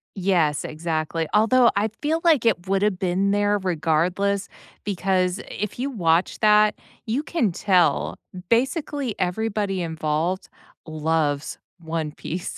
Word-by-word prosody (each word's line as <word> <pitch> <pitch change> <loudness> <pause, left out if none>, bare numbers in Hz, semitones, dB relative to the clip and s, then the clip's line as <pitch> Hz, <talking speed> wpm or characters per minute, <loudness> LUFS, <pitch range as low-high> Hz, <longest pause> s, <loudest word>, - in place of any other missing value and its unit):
Yes, 175 -6 +1
exactly, 160 0 -2
although, 235 +3 +5
I 210 +2 +2
feel 315 +2 0
like 305 -9 +4
it 190 -5 +1
would've 195 0 +1
been 190 +1 +1
there 205 0 +2
regardless 180 +3 0 0.3
because 190 -1 0
i - - -8 0.2
if 210 - -3
you 270 +3 -1
watch 175 -7 +1
that, 210 -1 +5 0.3
you 250 +7 -1
can 270 - 0
tell 165 - +2 0.3
basically 265 +1 0
everybody 195 0 -1
involved 160 +2 -2 0.4
loves 155 -2 -1 0.2
One 160 -2 -3
Piece, 170 +4 -6
190 Hz, 125 wpm, -23 LUFS, 165-210 Hz, 0.4 s, although